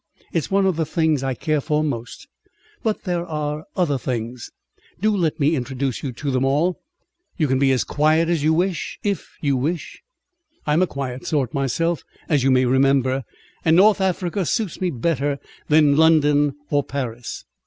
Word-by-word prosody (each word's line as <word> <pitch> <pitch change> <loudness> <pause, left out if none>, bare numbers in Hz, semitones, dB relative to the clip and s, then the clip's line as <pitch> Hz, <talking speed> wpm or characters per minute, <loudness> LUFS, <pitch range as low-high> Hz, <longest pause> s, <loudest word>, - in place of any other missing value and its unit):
It's 165 -4 -1
one 195 0 +2
of 185 -4 +1
the 160 - +1
things 160 -4 +1
I 135 -1 -1
care 155 0 0
for 150 +1 0
most, 120 -6 -5 0.5
but 220 -3 -1
there 175 -3 -1
are 150 -2 -4
other 150 -7 +1
things. 120 -1 -4 0.5
Do 215 +2 +2
let 165 -4 0
me 150 +3 +3
introduce 130 -1 -3
you 135 - -3
to 140 +4 -3
them 130 0 +1
all. 150 +7 +1 0.6
You 155 - +2
can 130 0 +1
be 135 -1 +4
as 130 - +2
quiet 155 +2 +2
as 165 -4 0
you 155 - +3
wish, 175 0 -1
if 200 -2 -3
you 140 -3 +1
wish. 150 +6 -3 0.6
I'm 150 +3 +2
a 185 - +3
quiet 130 -3 -5
sort 140 -7 0
myself, 155 +4 0 0.3
as 145 -5 +2
you 135 - +3
may 130 -1 +4
remember, 130 0 +2 0.4
and 160 -1 +4
North 200 +2 +5
Africa 185 0 0
suits 200 +1 -2
me 185 - +1
better 145 0 -1 0.3
than 150 -2 +5
London 145 -2 +4 0.2
or 145 -1 +2
Paris. 125 -4 -5
150 Hz, 175 wpm, -22 LUFS, 135-170 Hz, 0.6 s, North